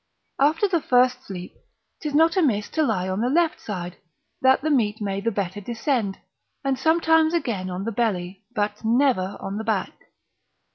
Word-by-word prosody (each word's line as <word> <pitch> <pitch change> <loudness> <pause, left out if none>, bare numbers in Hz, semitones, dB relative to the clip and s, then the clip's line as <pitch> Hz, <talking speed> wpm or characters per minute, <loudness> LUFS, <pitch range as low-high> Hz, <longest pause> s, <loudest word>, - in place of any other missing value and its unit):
After 310 +8 +3
the 345 -4 +1
first 250 0 +2
sleep 180 -2 -7 0.5
'tis 300 -2 -3
not 325 +3 +4
amiss 245 - +1
to 315 - -1
lie 185 -11 0
on 190 +3 -2
the 245 - +1
left 330 +3 +1
side, 180 -4 -5 0.4
that 265 +1 +4
the 310 - +1
meat 220 -6 +1
may 200 -2 -2
the 230 - +1
better 200 -2 -3
descend; 230 -2 -1 0.5
and 270 -1 0
sometimes 320 +2 +3
again 210 - -2
on 180 +1 -4
the 230 - -2
belly, 195 -4 -2
but 210 0 -2
never 230 -5 +2
on 195 +1 -5
the 220 - -3
back. 220 -3 -1
230 Hz, 175 wpm, -24 LUFS, 200-290 Hz, 0.5 s, not